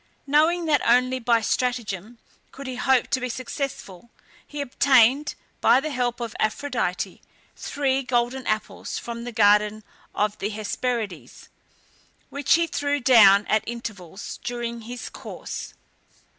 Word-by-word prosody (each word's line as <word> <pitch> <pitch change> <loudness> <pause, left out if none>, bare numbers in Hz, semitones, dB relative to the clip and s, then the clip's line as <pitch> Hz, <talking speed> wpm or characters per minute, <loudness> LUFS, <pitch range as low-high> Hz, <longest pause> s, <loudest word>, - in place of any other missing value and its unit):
Knowing 315 +5 +3
that 300 -3 +2
only 255 +2 +3
by 235 -1 +2
stratagem 235 -3 -2 0.3
could 275 - -10
he 260 -1 -5
hope 260 0 +2
to 270 -1 +1
be 255 0 -3
successful, 240 -5 -5 0.4
he 295 - -8
obtained, 270 0 +3 0.3
by 250 - +6
the 305 +3 -4
help 245 -2 -1
of 235 -2 -5
Aphrodite, 215 -5 -2 0.3
three 270 -2 -1
golden 250 0 -1
apples 215 - -3
from 235 0 -6
the 245 - -5
garden 210 0 +3 0.3
of 210 0 0
the 205 - -2
Hesperides, 215 - -4 0.8
which 285 +2 +3
he 335 0 +2
threw 290 -2 -1
down 215 -6 +7
at 215 - +2
intervals 205 -6 -7
during 235 -1 -4
his 245 +2 -7
course. - - -8
245 Hz, 130 wpm, -24 LUFS, 215-265 Hz, 0.8 s, down